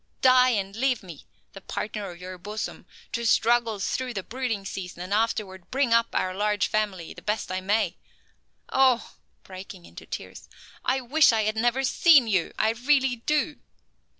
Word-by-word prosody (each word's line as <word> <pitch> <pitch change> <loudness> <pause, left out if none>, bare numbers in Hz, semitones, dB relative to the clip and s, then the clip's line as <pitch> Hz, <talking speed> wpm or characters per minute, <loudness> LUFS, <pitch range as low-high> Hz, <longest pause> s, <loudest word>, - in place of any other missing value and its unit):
Die 255 -1 +6
and 200 -4 -1
leave 255 -1 0
me, 170 -6 -12 0.3
the 195 - -10
partner 210 0 -5
of 175 -1 -11
your 185 0 -8
bosom, 210 +4 -6 0.2
to 235 - -2
struggle 230 -1 +3
through 250 +5 -3
the 195 - -3
brooding 235 -4 -3
season 180 -3 -6
and 185 +2 -4
afterward 205 -4 -1
bring 260 -3 +1
up 230 0 +4
our 185 - 0
large 210 +1 +1
family 205 -6 -2
the - - -12
best 210 -3 -2
I 185 0 -2
may. 205 +4 0 0.7
Oh," 260 -3 +2 0.3
breaking 185 -1 -10
into - - -12
tears, - - -8 0.3
"I 265 +1 +1
wish 285 +4 +4
I 220 -1 +1
had 215 +1 0
never 240 +4 +1
seen 290 -1 +5
you, 185 -6 +1
I 220 - +2
really 260 +1 +2
do." 300 +5 0
220 Hz, 170 wpm, -26 LUFS, 195-250 Hz, 0.7 s, Die